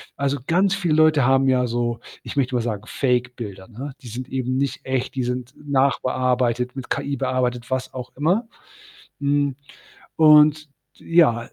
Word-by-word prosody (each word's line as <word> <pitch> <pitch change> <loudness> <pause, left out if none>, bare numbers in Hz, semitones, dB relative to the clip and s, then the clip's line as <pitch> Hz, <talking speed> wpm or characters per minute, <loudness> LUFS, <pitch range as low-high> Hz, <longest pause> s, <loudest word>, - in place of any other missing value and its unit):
Also, 140 0 -1
ganz 190 +3 +3
viele 180 -5 0
Leute 155 -3 +4
haben 135 +1 +3
ja 125 -1 +2
so, 120 0 -2 0.2
ich - - -7
möchte 130 -2 +1
mal 120 - +1
sagen, 110 -3 -3
Fake-Bilder, 125 -7 -2
ne? 125 +5 -7
Die 130 - -11
sind 125 +3 -7
eben 130 -1 -2
nicht 140 0 -2
echt, 130 -1 -2
die 130 - -1
sind 125 0 -4
nachbearbeitet, 125 -2 +1
mit 130 - -7
KI 140 0 -2
bearbeitet, 125 -1 -1
was 130 -1 -2
auch 125 -1 -7
immer. 180 - +1 0.7
Hm, 140 -1 +1 0.6
und, 150 -1 +6 0.3
ja 165 -9 +3
130 Hz, 155 wpm, -22 LUFS, 125-145 Hz, 0.7 s, und